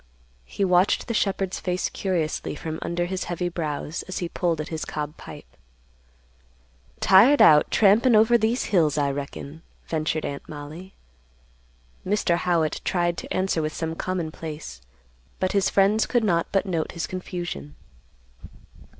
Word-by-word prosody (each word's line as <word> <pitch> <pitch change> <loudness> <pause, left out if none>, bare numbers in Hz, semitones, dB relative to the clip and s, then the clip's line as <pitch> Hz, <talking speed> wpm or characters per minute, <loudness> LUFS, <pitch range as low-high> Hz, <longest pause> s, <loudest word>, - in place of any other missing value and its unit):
He 195 - -2
watched 180 +1 +3
the 230 - -2
shepherd's 195 -3 -1
face 180 0 -1
curiously 170 -6 -2
from 160 +1 -5
under 170 +1 -1
his 185 +1 -3
heavy 175 0 -2
brows, 155 -1 -4
as 185 - -5
he 175 - -2
pulled 170 -2 -1
at 155 - -4
his 160 -1 -4
cob 150 0 -5
pipe. - - -11 1.5
"Tired 220 +10 +6
out 150 -1 +7
trampin' 220 +4 +4
over 220 +2 +5
these 230 +2 +2
hills, 155 -6 +3
I 140 -1 +1
reckon," 140 +2 -7 0.2
ventured 155 -1 -2
Aunt 140 0 -6
Mollie. 155 +6 -9 1.1
Mr. 185 -3 +1
Howitt 170 -3 0
tried 175 -2 0
to - - -8
answer 185 -3 0
with 155 0 -3
some 160 -1 -3
commonplace, 160 - -5 0.6
but 185 - 0
his 200 -1 +2
friends 200 +3 +3
could 240 -2 +1
not 170 -5 +1
but 195 - +1
note 170 -5 -2
his 170 - -3
confusion. 175 - -6
175 Hz, 145 wpm, -24 LUFS, 155-190 Hz, 1.5 s, out